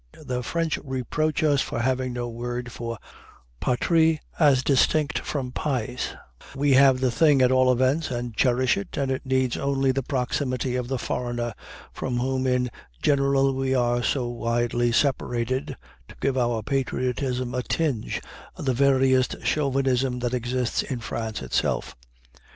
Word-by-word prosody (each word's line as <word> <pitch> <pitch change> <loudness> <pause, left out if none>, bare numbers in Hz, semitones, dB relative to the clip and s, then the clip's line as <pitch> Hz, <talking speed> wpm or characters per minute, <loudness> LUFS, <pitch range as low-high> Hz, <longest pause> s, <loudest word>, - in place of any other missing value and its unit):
The 125 -1 -2
French 165 +5 -1
reproach 150 +4 -1
us 145 -3 +3
for 145 - -3
having 130 +1 0
no 120 0 -3
word 120 +1 -5
for 115 0 -5 0.6
"patrie" 160 +5 +2 0.2
as 140 -5 +5
distinct 150 +2 +2
from 130 -4 -4
"pays"; 125 -3 -2 0.4
we 140 +1 +2
have 130 -1 +5
the 130 -2 +2
thing 145 +2 +4
at 125 - +4
all 130 0 +4
events, 130 +6 +1
and 120 -2 -4
cherish 125 - +2
it, 200 -2 -6
and 135 -2 0
it 130 0 -3
needs 130 -2 +1
only 135 -1 +1
the 135 +1 -1
proximity 130 -1 -1
of 125 -1 -2
the 130 +1 -1
foreigner, 120 -1 -3 0.4
from 125 -2 -3
whom 130 +1 0
in 125 -1 +1 0.3
general 140 -1 +3
we 135 0 0
are 120 -1 +2
so 125 +1 0
widely 120 0 0
separated, 130 -1 0 0.3
to - - -13
give 135 -1 0
our 120 -3 0
patriotism 130 -1 -1
a 125 - 0
tinge 140 -4 -1 0.4
of - - -7
the 130 - +2
veriest 130 -1 +3
chauvinism 135 -3 +1
that 125 0 -2
exists 125 0 -1
in 130 -3 -4
France 110 - -4
itself. 65 - -1
130 Hz, 150 wpm, -25 LUFS, 120-135 Hz, 0.6 s, as